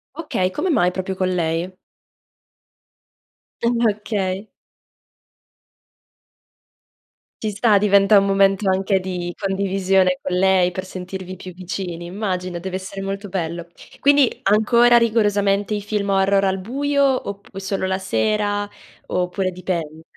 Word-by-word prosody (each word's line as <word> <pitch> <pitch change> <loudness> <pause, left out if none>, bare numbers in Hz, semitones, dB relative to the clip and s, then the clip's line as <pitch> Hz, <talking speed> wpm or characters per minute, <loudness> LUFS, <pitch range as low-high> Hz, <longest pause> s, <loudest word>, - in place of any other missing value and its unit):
Okay, 240 - -1
come 305 - -2
mai 180 -9 +3
proprio 190 +1 -4
con 185 0 0
lei? 170 +1 -1 1.9
Ah 235 +1 +2 0.2
okay. 200 -1 -3 2.9
Ci 215 -1 -1
sta, 210 +1 +3
diventa 200 0 +5
un 195 - +4
momento 195 0 +3
anche 190 0 +1
di 180 -2 -4
condivisione 190 -1 +1
con 185 - -3
lei 185 -1 +3
per 185 +1 -5
sentirvi 185 0 -7
più 185 -1 -10
vicini. 180 -1 -5
Immagino, 185 -1 -3
deve 185 +1 -4
essere 190 +1 -7
molto 195 +1 -4
bello. 170 -2 -4 0.3
Quindi, 285 -2 +5
ancora 235 +4 +5
rigorosamente 205 -3 +2
i 205 - -2
film 205 -1 -2
horror 195 0 +3
al 190 0 0
buio, 275 +4 0
oppu 200 -1 -7
solo 195 0 -2
la 190 0 0
sera, 205 +1 -1 0.4
oppure 180 +1 -1
dipende? 165 -4 -4
195 Hz, 120 wpm, -21 LUFS, 185-205 Hz, 2.9 s, diventa